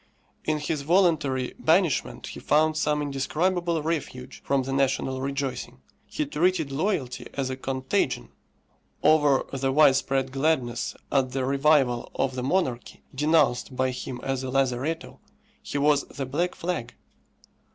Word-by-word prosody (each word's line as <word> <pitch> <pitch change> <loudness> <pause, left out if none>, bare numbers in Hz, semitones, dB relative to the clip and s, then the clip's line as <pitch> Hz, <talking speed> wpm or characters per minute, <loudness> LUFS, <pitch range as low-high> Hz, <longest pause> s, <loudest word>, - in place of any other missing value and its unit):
In 155 0 +1
his 150 0 -2
voluntary 150 -6 +2
banishment 165 -1 +1
he - - -8
found 155 +2 +2
some 150 -1 +1
indescribable 165 +4 0
refuge 140 -5 -4
from 140 -1 +1
the 135 +1 -4
national 135 -1 0
rejoicing. 140 - -3 0.3
He 150 - -2
treated 160 +1 +1
loyalty 140 -4 -2
as 135 -2 -1
a - - -2
contagion; 130 - -1 0.7
over 150 -3 +4
the 135 0 0
widespread 135 -2 +3
gladness 135 -4 0 0.2
at 130 -2 +1
the 130 -1 -1
revival 135 -3 +2
of 135 -1 0
the 125 - -3
monarchy, 130 -4 -1
denounced 140 -3 +2
by 130 0 +1
him 125 0 -6
as 135 -1 -1
a 130 - -3
lazaretto, 135 +5 -1 0.4
he - - -4
was 145 0 +3
the 135 - -6
black 165 +7 -1
flag. 170 -8 -4
140 Hz, 135 wpm, -26 LUFS, 130-155 Hz, 0.7 s, over